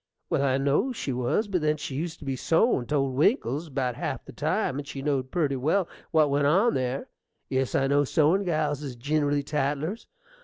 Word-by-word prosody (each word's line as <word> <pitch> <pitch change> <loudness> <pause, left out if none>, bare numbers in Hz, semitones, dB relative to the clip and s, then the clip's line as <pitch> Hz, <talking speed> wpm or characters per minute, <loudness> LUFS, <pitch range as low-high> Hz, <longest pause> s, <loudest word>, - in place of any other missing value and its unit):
well, - - +2
I 135 -1 +2
know 140 - +1
she 145 - -3
was; 125 - 0
but 185 -4 -1
then 155 0 +1
she 145 - -6
used 160 +4 -3
to 150 - -12
be 135 -1 -1
sewin' 165 - +2
't 150 - -1
old 135 -2 +1
Winkle's 150 - +1
about 130 -3 -1
half - - -4
the - - -10
time, 135 - -1
and 145 - -7
she 135 -1 -6
know'd 135 -3 0
purty 150 -5 0
well 165 +8 +1 0.2
what 155 -3 +3
went 140 0 +2
on 195 +10 +4
there: 130 +1 -2 0.4
yes, 130 -1 0
I 135 - +3
know 140 +1 +3
sewin' 160 +7 +2
gals 155 -5 0
is 135 -4 -6
ginerally 145 +3 0
tattlers.... 150 +7 -2
145 Hz, 205 wpm, -27 LUFS, 135-160 Hz, 0.4 s, on